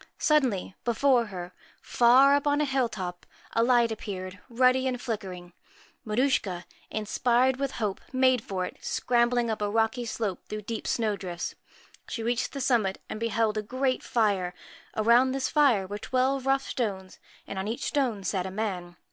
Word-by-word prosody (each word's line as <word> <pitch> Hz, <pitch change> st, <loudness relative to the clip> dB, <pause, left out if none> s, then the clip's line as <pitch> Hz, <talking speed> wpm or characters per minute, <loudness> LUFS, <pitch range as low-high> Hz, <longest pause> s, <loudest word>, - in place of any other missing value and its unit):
Suddenly, 255 Hz, -12 st, +1 dB
before 245 Hz, +1 st, +3 dB
her 180 Hz, -3 st, -7 dB, 0.3 s
far 255 Hz, +4 st, +5 dB
up 285 Hz, 0 st, +2 dB
on 290 Hz, 0 st, +3 dB
a 300 Hz, -, +2 dB
hill 265 Hz, -3 st, +1 dB
top 180 Hz, -4 st, -6 dB, 0.3 s
a 230 Hz, -, +2 dB
light 235 Hz, -1 st, +4 dB
appeared, 185 Hz, -3 st, -6 dB
ruddy 255 Hz, +2 st, +3 dB
and 250 Hz, -1 st, -2 dB
flickering. 190 Hz, -7 st, -5 dB, 0.5 s
Maruschka, 210 Hz, -6 st, 0 dB, 0.2 s
inspired 245 Hz, +4 st, +1 dB
with 275 Hz, -1 st, -2 dB
hope, 210 Hz, -4 st, -2 dB
made 255 Hz, -2 st, +3 dB
for 185 Hz, -2 st, -3 dB
it, -, -, -8 dB
scrambling 240 Hz, -1 st, +1 dB
up 215 Hz, -, -3 dB
a 205 Hz, -, 0 dB
rocky 225 Hz, +3 st, +1 dB
slope 215 Hz, -4 st, -3 dB
through 215 Hz, 0 st, -5 dB
deep 225 Hz, +2 st, -5 dB
snow 220 Hz, -3 st, 0 dB
drifts. 175 Hz, -3 st, -5 dB, 0.6 s
She 230 Hz, -, -4 dB
reached 240 Hz, +2 st, -1 dB
the 275 Hz, -, -4 dB
summit, 230 Hz, -7 st, +1 dB
and 215 Hz, -, -5 dB
beheld 225 Hz, -1 st, 0 dB
a -, -, -1 dB
great 255 Hz, +4 st, -1 dB
fire. 195 Hz, -6 st, 0 dB, 0.4 s
Around 240 Hz, +4 st, +4 dB
this 270 Hz, -1 st, -1 dB
fire 265 Hz, -10 st, +3 dB
were 205 Hz, +2 st, -6 dB
twelve 260 Hz, +3 st, 0 dB
rough 270 Hz, 0 st, +3 dB
stones, 195 Hz, -7 st, -3 dB, 0.3 s
and 190 Hz, -, -5 dB
on 190 Hz, -, -3 dB
each 230 Hz, +5 st, -3 dB
stone 250 Hz, -9 st, 0 dB
sat 185 Hz, 0 st, -1 dB
a -, -, -4 dB
man. 185 Hz, -4 st, -4 dB
230 Hz, 170 wpm, -27 LUFS, 200-255 Hz, 0.6 s, far